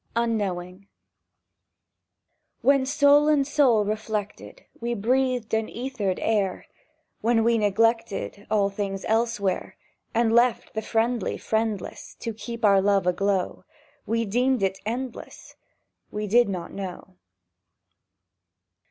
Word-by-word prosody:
UNKNOWING 200 -5 -2 1.7
WHEN, 275 -1 +3
soul 285 +1 +5
in 295 -3 +3
soul 265 -7 +3
reflected, 215 - -4
We 235 0 -2
breathed 250 +1 0
an 220 0 +1
æthered 235 -7 -3
air, 205 -4 0 0.5
When 225 0 +2
we 230 0 +3
neglected 210 -1 0
All 205 -2 +2
things 195 -1 -4
elsewhere, 220 -4 0 0.4
And 230 -1 +3
left 240 +1 +2
the 220 - -2
friendly 225 -1 0
friendless 220 -3 -3
To 230 - -3
keep 225 +2 -4
our 195 -2 +5
love 200 -1 +2
aglow, 190 +1 0 0.4
We 230 +1 0
deemed 245 +2 +1
it 190 0 0
endless... 245 +2 -6 0.5
—We 210 0 -4
did 235 +2 +4
not 180 -3 -5
know! 190 -1 -7
220 Hz, 110 wpm, -25 LUFS, 200-240 Hz, 1.7 s, soul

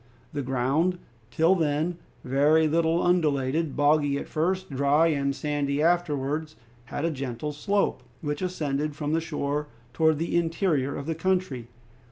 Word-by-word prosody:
The 145 - -2
ground, 135 +8 +1 0.3
till 160 +9 +3
then, 160 0 0 0.2
very 145 +5 +3
little 165 +2 +2
undulated, 155 -3 +1
boggy 145 -1 +3
at - - -5
first, 185 +3 -1
dry 140 +4 +3
and 140 -2 0
sandy 145 -1 -1
afterwards, 155 -2 0 0.3
had 145 +5 -3
a 165 - +1
gentle 135 0 -4
slope, 200 +8 0 0.2
which 145 -1 -3
ascended 150 -5 -2
from 150 0 -2
the 165 - +2
shore 150 -2 -2 0.3
towards 160 -1 +3
the 165 +3 -2
interior 165 -5 +1
of 140 - -5
the 165 - -1
country. 165 -8 -1
150 Hz, 145 wpm, -26 LUFS, 140-165 Hz, 0.3 s, till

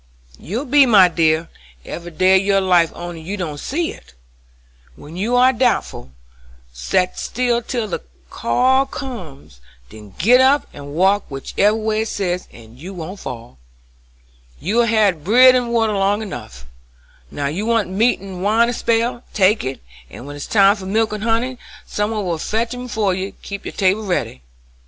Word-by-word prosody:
"You 230 - -4
be, 280 0 +5
my 195 -6 +6
dear, 160 -1 +1 0.4
every 175 0 -7
day 185 +3 +3
of - - -3
your 195 0 +2
life 180 -3 +3
only 175 -1 -7
you 195 +6 -5
don't 155 -6 -5
see 325 - -2
it. - - -16 0.8
When 150 - -12
you 215 +7 -1
are 255 +1 +5
doubtful, 240 - -1 0.6
set 180 - -1
still 240 -1 -1
till 235 -2 -3
the 185 - -4 0.3
call 260 - +2
comes, 175 - -9 0.3
then 105 -3 -13
git 245 +8 +5
up 275 +2 +4
and 145 0 -9
walk 195 +4 +2
whichever 195 +9 0
way 220 0 -1
it 220 - -2
says, 180 -4 -3
and 115 +1 -15
you 185 +6 -8
won't 180 +4 -7
fall. 115 - -9 1.0
You've 230 +6 +1
had 205 -8 +2
bread 250 +7 +7
and 245 -2 0
water 225 -2 +1
long 200 +2 +1
enough, 60 - -9 0.6
now 145 - -4
you 175 +10 -2
want 230 -3 +1
meat 215 +7 +1
and 190 -2 -8
wine 225 +4 +3
a - - -2
spell; 235 +1 0
take 200 +2 +3
it, 130 0 -5 0.3
and 120 - -11
when 145 +1 -8
it's 145 - -7
time 200 -1 +5
for 190 -1 -8
milk 220 +2 0
and 210 - -5
honey 235 +3 -1 0.3
some 210 0 -2
one 215 -3 -3
will 170 -3 -2
fetch 225 +8 -2
'em 250 0 -6
ef 245 - -8
you 195 -2 -1
keep 200 -1 -7
your - - -4
table 195 +2 +1
ready. 175 - -2
200 Hz, 175 wpm, -19 LUFS, 170-230 Hz, 1.0 s, bread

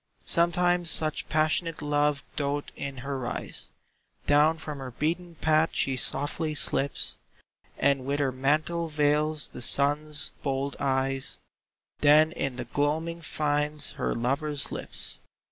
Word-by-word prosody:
Sometimes 175 0 +2
such 155 -1 +2
passionate 155 +1 +1
love 145 -2 0
doth 145 0 -2
in 140 -1 -6
her 140 -1 -3
rise, 125 -1 -5 0.6
Down 150 +3 +4
from 150 -2 -7
her 130 -1 -6
beaten 165 +7 -3
path 155 +1 +2
she 135 - 0
softly 150 +4 +1
slips, 140 -1 +1 0.6
And 140 -1 +2
with 140 +2 -2
her 140 -2 +1
mantle 155 +6 0
veils 150 0 +1
the - - -9
Sun's 145 +3 +3
bold 135 0 -2
eyes, 135 -1 -1 0.6
Then 150 +2 +5
in 140 -6 -3
the 125 -1 -5
gloaming 160 +5 -1
finds 150 -1 0
her - - -2
lover's 140 +4 -1
lips. - - -3
145 Hz, 130 wpm, -27 LUFS, 140-155 Hz, 0.6 s, Then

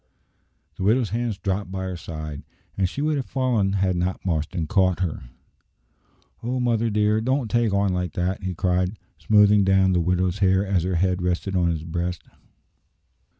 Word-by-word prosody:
The - - -4
widow's 110 0 +2
hands 115 -2 -2
dropped 100 -1 -3
by 95 0 -4
her 95 -1 -4
side, 75 -3 -7 0.3
and 95 -2 +1
she 140 - -4
would 155 -1 +1
have 135 - -2
fallen 120 -7 0
had 95 -2 +1
not 90 +2 -2
Marston 80 0 -1
caught 95 +1 +2
her. 85 -8 -3 1.2
"O 125 +2 -2
mother 115 -2 +1
dear, 105 +1 +2
don't 130 -1 -1
take 120 -2 +2
on 100 -1 +1
like 90 -2 -2
that!" 90 +2 -2
he 95 -1 -4
cried, 90 +3 0 0.2
smoothing 105 -1 +5
down 95 -1 +3
the 90 - +2
widow's 90 +2 0
hair 95 0 +3
as 95 -3 +1
her 90 +1 -1
head 90 +1 +1
rested 90 +2 -1
on 90 -2 +2
his 80 -2 -2
breast. 85 +1 -3
95 Hz, 175 wpm, -24 LUFS, 90-105 Hz, 1.2 s, smoothing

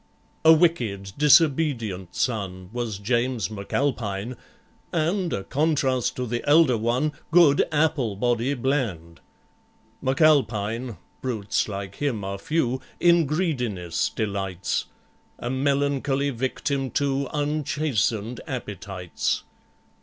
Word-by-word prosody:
A 160 - +8
wicked, 120 - +2
disobedient 140 - +3
son 95 -6 -2
Was 120 -4 -3
JAMES 120 +2 0
M'ALPINE, 110 0 -2 0.6
and 175 +2 0
A 95 - -2
contrast 135 -3 +1
to 125 - -2
the 120 0 -3
elder 150 -4 +6
one, 120 +7 0 0.2
Good 160 -4 +6
APPLEBODY 125 -4 +1
BLAND. 115 - -2 0.8
M'ALPINE—brutes 120 - 0
like 100 -1 -6
him 130 -8 -1
are 100 0 -4
few— 130 -2 0 0.2
In 170 -3 +4
greediness 125 - -1
delights, 100 -4 -2 0.5
A 120 - -4
melancholy 140 +1 +1
victim 135 +2 -2
to 140 0 0
Unchastened 145 -6 -1
appetites. 100 -7 -3
125 Hz, 95 wpm, -25 LUFS, 105-145 Hz, 0.8 s, A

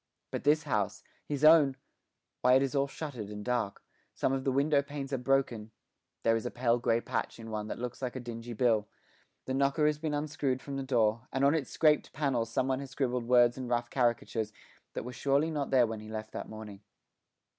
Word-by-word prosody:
But - - -3
this 150 +1 +4
house, 105 -7 -1 0.2
his 145 -1 -3
own 155 -4 +7 0.7
why, 125 0 +5
it 135 - +5
is 135 - -2
all 140 -1 +2
shuttered 135 -8 -6
and 105 0 -7
dark; 120 -5 -1 0.3
some 135 - +1
of 135 0 -2
the 135 - +2
window 140 +2 +3
panes 140 -1 -6
are 135 - 0
broken; 125 -4 0 0.5
there 115 0 +4
is 115 - -2
a 125 - -2
pale 120 -1 +1
grey 115 -1 +2
patch - - -3
in 115 -1 -9
one 105 -1 -3
that - - -4
looks 125 +1 -5
like 125 -1 -3
a - - -3
dingy 120 -1 -7
bill; 110 -2 +2 0.6
the 130 - -2
knocker 140 +3 +2
has 150 -1 +2
been 155 -1 -1
unscrewed 145 -3 -1
from 140 +1 -7
the 135 - -2
door, 115 -2 +1
and 135 +1 +1
on 140 - +5
its 155 -5 -1
scraped 155 -2 +2
panels 130 -6 0
someone 130 +2 0
has 140 -1 -7
scribbled 125 -3 -1
words 120 0 +5
and 125 -2 -5
rough 120 0 0
caricatures 115 -3 0 0.4
that - - -3
were 125 - -6
surely 140 +5 +1
not 145 -3 -2
there 130 -2 +5
when 110 -1 -4
he 110 0 -10
left 110 0 -6
that - - -6
morning. 110 -2 -9
125 Hz, 215 wpm, -31 LUFS, 115-140 Hz, 0.7 s, own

